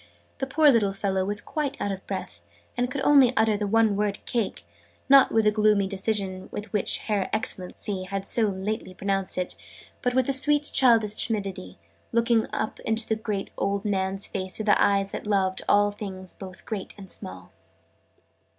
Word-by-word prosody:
The 270 Hz, -, -2 dB
poor 295 Hz, +2 st, +4 dB
little 210 Hz, -5 st, +2 dB
fellow 195 Hz, -1 st, -1 dB
was 205 Hz, +2 st, -1 dB
quite 285 Hz, +3 st, -4 dB
out 205 Hz, -, -2 dB
of 195 Hz, 0 st, -7 dB
breath, 185 Hz, -, -6 dB, 0.3 s
and 245 Hz, 0 st, -1 dB
could 275 Hz, +1 st, -4 dB
only 270 Hz, -4 st, +5 dB
utter 220 Hz, -1 st, +3 dB
the 205 Hz, 0 st, -2 dB
one 220 Hz, 0 st, +3 dB
word 205 Hz, 0 st, -1 dB
"Cake!" 220 Hz, -, -3 dB, 0.4 s
not 275 Hz, -1 st, +6 dB
with 225 Hz, -, +2 dB
the 210 Hz, -, +5 dB
gloomy 210 Hz, -2 st, +2 dB
decision 190 Hz, -1 st, -1 dB
with 210 Hz, +2 st, -7 dB
which 205 Hz, -, +2 dB
Her 205 Hz, -3 st, -1 dB
Excellency 190 Hz, -2 st, -2 dB
had 195 Hz, +1 st, -4 dB
so 220 Hz, +1 st, +3 dB
lately 190 Hz, 0 st, -4 dB
pronounced 195 Hz, -1 st, -2 dB
it, 180 Hz, -1 st, -1 dB, 0.5 s
but 250 Hz, 0 st, -1 dB
with 260 Hz, -1 st, +2 dB
a 275 Hz, -, +2 dB
sweet 295 Hz, +2 st, +5 dB
childish 225 Hz, -5 st, +4 dB
timidity, 195 Hz, -, -5 dB, 0.3 s
looking 230 Hz, -1 st, +2 dB
up 215 Hz, -, -3 dB
into 220 Hz, 0 st, 0 dB
the 215 Hz, -3 st, -3 dB
old 200 Hz, +1 st, -1 dB
man's 195 Hz, -1 st, -1 dB
face 185 Hz, -2 st, -2 dB
with 215 Hz, -1 st, -2 dB
eyes 200 Hz, -1 st, +3 dB
that -, -, -6 dB
loved 190 Hz, -2 st, 0 dB
'all 205 Hz, 0 st, +4 dB
things 190 Hz, -3 st, -7 dB
both 185 Hz, -2 st, -11 dB
great 210 Hz, -4 st, -5 dB
and 195 Hz, -3 st, -11 dB
small.' 90 Hz, 0 st, -9 dB
205 Hz, 175 wpm, -25 LUFS, 195-225 Hz, 0.5 s, not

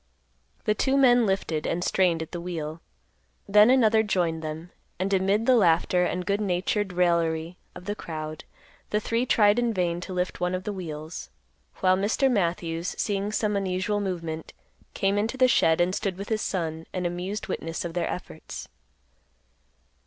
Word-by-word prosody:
The 210 Hz, -, +3 dB
two 265 Hz, +5 st, +1 dB
men 245 Hz, -4 st, +5 dB
lifted 165 Hz, -5 st, -1 dB
and 175 Hz, +1 st, -1 dB
strained 175 Hz, -4 st, +2 dB
at 160 Hz, -, -12 dB
the 175 Hz, -, -5 dB
wheel. 165 Hz, -2 st, -5 dB, 0.7 s
Then 210 Hz, +3 st, +6 dB
another 225 Hz, -4 st, +5 dB
joined 175 Hz, -6 st, 0 dB
them, 160 Hz, +2 st, -6 dB, 0.3 s
and, 190 Hz, +2 st, -1 dB
amid 195 Hz, +3 st, +2 dB
the 255 Hz, -, +5 dB
laughter 180 Hz, -2 st, +3 dB
and 180 Hz, 0 st, -2 dB
good 200 Hz, +2 st, 0 dB
natured 195 Hz, +1 st, 0 dB
raillery 170 Hz, -1 st, +1 dB, 0.2 s
of 180 Hz, 0 st, -10 dB
the 205 Hz, -, -1 dB
crowd, 155 Hz, -5 st, -6 dB, 0.5 s
the 210 Hz, -, +1 dB
three 230 Hz, +4 st, -1 dB
tried 210 Hz, 0 st, +4 dB
in 235 Hz, -2 st, 0 dB
vain 175 Hz, -1 st, 0 dB
to 185 Hz, -, -7 dB
lift 180 Hz, 0 st, -2 dB
one 180 Hz, +1 st, +1 dB
of 185 Hz, -, -4 dB
the 210 Hz, -, -3 dB
wheels; 160 Hz, -3 st, -6 dB, 0.5 s
while 185 Hz, 0 st, +5 dB
Mr. 220 Hz, +7 st, +2 dB
Matthews, 170 Hz, -4 st, -1 dB
seeing 200 Hz, 0 st, -1 dB
some 210 Hz, -1 st, 0 dB
unusual 195 Hz, +1 st, 0 dB
movement, 165 Hz, -5 st, -4 dB, 0.4 s
came 195 Hz, +1 st, +1 dB
into 225 Hz, +5 st, -1 dB
the 255 Hz, -1 st, +5 dB
shed 165 Hz, -9 st, +3 dB
and 175 Hz, +1 st, +2 dB
stood 195 Hz, -2 st, -2 dB
with 200 Hz, +1 st, -6 dB
his 220 Hz, -1 st, 0 dB
son, 160 Hz, -3 st, -3 dB
an 180 Hz, -1 st, -2 dB
amused 180 Hz, +4 st, -3 dB
witness 165 Hz, -3 st, -4 dB
of 170 Hz, -, -4 dB
their 175 Hz, -, -1 dB
efforts. 170 Hz, -3 st, -7 dB
185 Hz, 170 wpm, -26 LUFS, 170-210 Hz, 0.7 s, Then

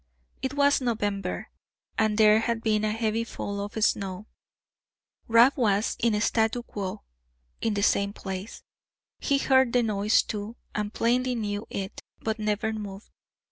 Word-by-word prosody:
It 265 Hz, +2 st, -2 dB
was 285 Hz, -1 st, +4 dB
November, 205 Hz, -6 st, -2 dB, 0.4 s
and 215 Hz, -1 st, +1 dB
there 215 Hz, 0 st, +6 dB
had 230 Hz, 0 st, -1 dB
been 215 Hz, -1 st, +2 dB
a 215 Hz, -, +1 dB
heavy 225 Hz, 0 st, 0 dB
fall 200 Hz, -3 st, -5 dB
of 205 Hz, -, -7 dB
snow. 195 Hz, 0 st, -1 dB, 1.0 s
Rab 235 Hz, +4 st, +6 dB
was 215 Hz, -6 st, +1 dB
in 230 Hz, -3 st, +2 dB
statu 225 Hz, +2 st, +1 dB
quo 195 Hz, -, -5 dB, 0.6 s
(in 225 Hz, -2 st, 0 dB
the 200 Hz, -, 0 dB
same 200 Hz, -2 st, +2 dB
place); 195 Hz, +1 st, -7 dB, 0.6 s
he 280 Hz, -, +2 dB
heard 265 Hz, -3 st, +3 dB
the 245 Hz, -1 st, +4 dB
noise, 210 Hz, -1 st, +2 dB
too, 210 Hz, +2 st, -5 dB, 0.2 s
and 210 Hz, 0 st, -2 dB
plainly 250 Hz, +2 st, +1 dB
knew 210 Hz, -2 st, -3 dB
it, 195 Hz, +1 st, -5 dB, 0.2 s
but 220 Hz, 0 st, -2 dB
never 215 Hz, +1 st, 0 dB
moved. 205 Hz, -1 st, -7 dB
215 Hz, 145 wpm, -27 LUFS, 205-235 Hz, 1.0 s, there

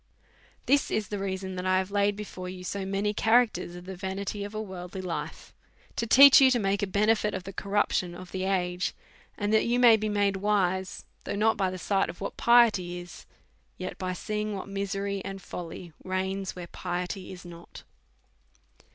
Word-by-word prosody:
' -, -, -32 dB
This 280 Hz, +3 st, +3 dB
is 210 Hz, -2 st, -1 dB
the 205 Hz, -, -3 dB
reason 190 Hz, -1 st, -3 dB
that 180 Hz, -, -4 dB
I 185 Hz, 0 st, +3 dB
have 190 Hz, +1 st, -1 dB
laid 205 Hz, 0 st, +2 dB
before 185 Hz, -3 st, -7 dB
you 185 Hz, 0 st, -8 dB
so 190 Hz, +1 st, -4 dB
many 200 Hz, +2 st, 0 dB
characters 225 Hz, -5 st, +2 dB
of 175 Hz, 0 st, -10 dB
the 190 Hz, 0 st, -6 dB
vanity 195 Hz, +2 st, -4 dB
of 205 Hz, +1 st, -7 dB
a -, -, -2 dB
worldly 190 Hz, -3 st, -7 dB
life, 165 Hz, -4 st, -5 dB, 0.4 s
to 230 Hz, -, -2 dB
teach 275 Hz, +4 st, +9 dB
you 265 Hz, -, +7 dB
to 255 Hz, -, +3 dB
make 200 Hz, -2 st, 0 dB
a 205 Hz, -, 0 dB
benefit 210 Hz, +2 st, +2 dB
of -, -, -5 dB
the 195 Hz, -, -8 dB
corruption 195 Hz, -3 st, 0 dB
of 180 Hz, 0 st, -10 dB
the 190 Hz, 0 st, -3 dB
age, 180 Hz, -2 st, -1 dB, 0.4 s
and 205 Hz, 0 st, -1 dB
that 220 Hz, -, +4 dB
you 240 Hz, +1 st, +2 dB
may 235 Hz, -3 st, +7 dB
be 215 Hz, 0 st, -2 dB
made 200 Hz, -1 st, +1 dB
wise, 190 Hz, -2 st, 0 dB, 0.2 s
though -, -, -3 dB
not 220 Hz, +2 st, +3 dB
by 190 Hz, -2 st, 0 dB
the 185 Hz, -, -5 dB
sight 195 Hz, +1 st, 0 dB
of 170 Hz, -, -8 dB
what 200 Hz, -, -5 dB
piety 215 Hz, -7 st, +4 dB
is, 175 Hz, 0 st, -10 dB, 0.5 s
yet 185 Hz, 0 st, -6 dB
by 185 Hz, -1 st, -2 dB
seeing 210 Hz, +2 st, -3 dB
what 190 Hz, -, -6 dB
misery 200 Hz, 0 st, -3 dB
and 195 Hz, 0 st, -6 dB
folly 175 Hz, -2 st, -8 dB
reigns, 190 Hz, +1 st, -2 dB
where 180 Hz, -1 st, -6 dB
piety 180 Hz, +2 st, -5 dB
is 180 Hz, -1 st, -10 dB
not. 170 Hz, 0 st, -12 dB
195 Hz, 195 wpm, -28 LUFS, 185-210 Hz, 0.5 s, teach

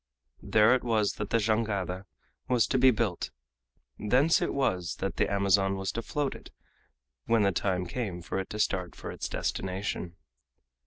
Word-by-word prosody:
There 110 Hz, +2 st, +4 dB
it 130 Hz, -, +1 dB
was 110 Hz, -3 st, +1 dB
that 105 Hz, -1 st, -4 dB
the -, -, +3 dB
jangada 105 Hz, -4 st, -1 dB, 0.4 s
was 125 Hz, -4 st, +3 dB
to 130 Hz, -, +1 dB
be 130 Hz, +1 st, +7 dB
built; 110 Hz, -6 st, 0 dB, 0.7 s
thence 130 Hz, +10 st, +3 dB
it -, -, 0 dB
was 90 Hz, -11 st, 0 dB
that -, -, -4 dB
the -, -, +1 dB
Amazon 100 Hz, -1 st, +3 dB
was 95 Hz, -1 st, -2 dB
to 115 Hz, -, -3 dB
float 145 Hz, +2 st, -2 dB
it -, -, -12 dB, 0.8 s
when 115 Hz, -2 st, +3 dB
the 100 Hz, -, +3 dB
time 90 Hz, 0 st, 0 dB
came 90 Hz, -4 st, -4 dB
for 95 Hz, -, -3 dB
it 95 Hz, -, -5 dB
to 105 Hz, -, -5 dB
start 95 Hz, -4 st, -1 dB
for -, -, -7 dB
its -, -, -5 dB
destination. 95 Hz, -2 st, -3 dB
105 Hz, 170 wpm, -29 LUFS, 95-115 Hz, 0.8 s, be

